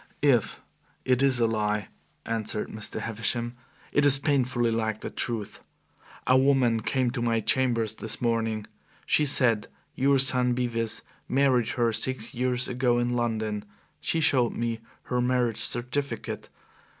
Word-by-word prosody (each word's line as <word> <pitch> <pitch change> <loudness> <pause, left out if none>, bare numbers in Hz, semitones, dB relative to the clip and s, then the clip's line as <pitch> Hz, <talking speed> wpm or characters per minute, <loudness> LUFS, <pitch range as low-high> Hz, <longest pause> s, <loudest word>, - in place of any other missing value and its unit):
"If 125 -7 +2 0.4
it 130 0 +2
is 135 -3 +3
a 115 - +3
lie," 105 -2 -1 0.4
answered 110 -1 -2
Mr. 110 -1 -5
Havisham, 115 +2 -2 0.4
"it 145 - +2
is 140 -1 +8
painfully 130 -4 +1
like 110 -1 -2
the - - -6
truth. 115 -4 -4 0.6
A 130 - +4
woman 130 -4 +3
came 125 +2 0
to 125 -1 -4
my 115 -1 +1
chambers 115 -1 +2
this 110 0 -3
morning. 115 -2 -1 0.4
She 150 - +2
said 115 -6 +2 0.3
your 140 +1 +2
son 125 -2 +4
Bevis 115 -2 -1 0.3
married 130 -4 +2
her 120 -2 +2
six 125 0 -2
years 125 0 -1
ago 125 -1 +1
in 120 0 0
London. 110 -3 -2 0.4
She 160 - 0
showed 130 -6 +3
me 115 -1 -2 0.2
her 125 -1 -1
marriage 125 -2 0
certificate. 120 +1 -3
120 Hz, 140 wpm, -26 LUFS, 115-130 Hz, 0.6 s, is